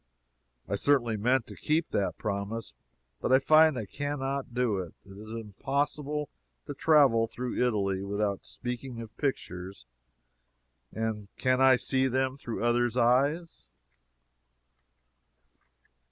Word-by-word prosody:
I 100 - -1
certainly 120 -3 +2
meant 120 +4 +1
to - - -11
keep 160 +2 0
that 100 - -1
promise, 100 - -4 0.5
but - - -1
I 130 - +8
find 155 +1 +5
I 110 - -3
can 145 +7 -4
not 135 -1 -3
do 120 -5 0
it. 90 -3 -7
It 95 -1 -13
is 110 +2 -10
impossible 140 +7 -2 0.4
to - - -5
travel 140 -7 +4
through 125 +2 -4
Italy 100 -5 0
without 100 0 -2
speaking 125 0 -6
of 115 -2 -9
pictures, 95 - -4 1.1
and 110 -2 -3
can 130 0 +2
I 130 -1 +7
see 130 +1 +1
them 130 +1 0
through 120 -5 -5
others' 120 0 +2
eyes? 140 +8 +1
125 Hz, 125 wpm, -29 LUFS, 105-135 Hz, 1.1 s, I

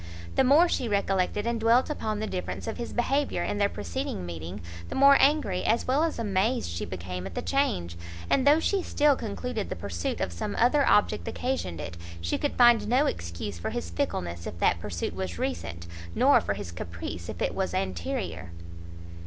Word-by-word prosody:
The - - +5
more 290 +7 +6
she 250 -8 -1
recollected 200 0 0
and 235 -1 0
dwelt 230 +3 +4
upon 220 -8 -2
the 215 - -1
difference 185 -4 -4
of 225 - -4
his 240 - -5
behaviour 275 +4 0
in 205 - -2
their 200 0 +3
preceding 90 - -4
meeting, 85 +3 -6 0.3
the - - -5
more 275 +1 +7
angry 275 -11 +3
as 230 +2 +2
well 275 +5 +2
as 330 - -1
amazed 220 +3 0
she 85 - -3
became 90 +1 -5
at 95 - -10
the - - -1
change, 90 - 0 0.3
and 275 0 +2
though 295 +2 +7
she 390 +3 +1
still 295 -4 +3
concluded 225 0 -4
the - - -3
pursuit 85 -1 -3
of 85 - -2
some 85 - -4
other 265 +5 +4
object 210 - +3
occasioned 250 - -2
it, 85 +3 -6 0.2
she 85 0 -2
could 290 - -1
find 240 -4 +6
no 255 +6 +3
excuse 85 - -4
for - - -3
his 85 - -4
fickleness 85 0 -3
if - - -6
that 85 0 +2
pursuit 85 -3 -4
was 95 -2 -4
recent, 85 0 -3 0.3
nor - - +5
for - - -2
his 85 - -6
caprice 85 0 -6
if - - -6
it - - 0
was - - -2
anterior. 90 -1 -3
195 Hz, 195 wpm, -27 LUFS, -, 0.3 s, more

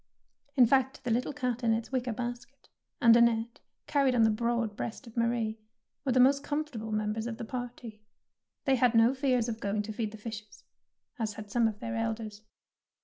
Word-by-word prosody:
In 255 -3 +7
fact, 265 +2 +1
the 245 - -1
little 245 +5 0
cat 250 -3 -2
in 225 -1 +3
its 225 +2 -3
wicker 255 -2 -1
basket, 245 +3 -6 0.3
and 230 -1 +7
Annette 235 0 +2 0.3
carried 275 -3 +2
on 230 - +5
the 220 - +5
broad 235 -1 -1
breast 230 +6 -5
of 230 - -13
Marie, 230 -2 0 0.4
were 270 - 0
the 255 - +3
most 275 +2 +5
comfortable 290 -8 -3
members 215 +1 -1
of 225 -2 -5
the 230 - -5
party. 240 -3 -7 0.6
They 270 -2 +3
had 245 -1 +3
no 225 +3 +6
fears 255 -3 +1
of 225 -1 -4
going 205 0 -1
to 215 +1 -6
feed 220 -1 -2
the 220 - -9
fishes, 210 -1 -9 0.6
as 215 -2 -1
had 210 -1 -9
some 235 0 +3
of 210 -2 -4
their 230 0 -4
elders. 225 -2 -3
235 Hz, 195 wpm, -30 LUFS, 220-250 Hz, 0.6 s, In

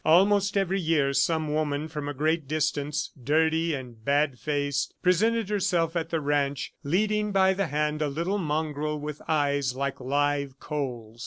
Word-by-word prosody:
Almost 200 +4 +4
every 195 0 +1
year, 155 -5 +2
some 155 0 +1
woman 150 -1 -1
from 150 -2 -5
a 145 - -5
great 155 +1 0
distance, 150 -1 -1
dirty 160 +3 +2
and 120 -4 -9
bad 140 -1 +1
faced, 145 -2 -1
presented 220 +4 +2
herself 175 -5 +1
at 165 -1 -1
the 165 - 0
ranch, 145 -1 -1
leading 210 +7 +1
by 190 -1 +4
the 195 -1 -1
hand 150 +1 -1
a 150 - +2
little 170 +8 -1
mongrel 150 -2 -2
with 150 0 -6
eyes 140 -4 +1
like 140 0 -2
live 140 0 0
coals. 120 -7 -5
150 Hz, 160 wpm, -27 LUFS, 145-170 Hz, -, Almost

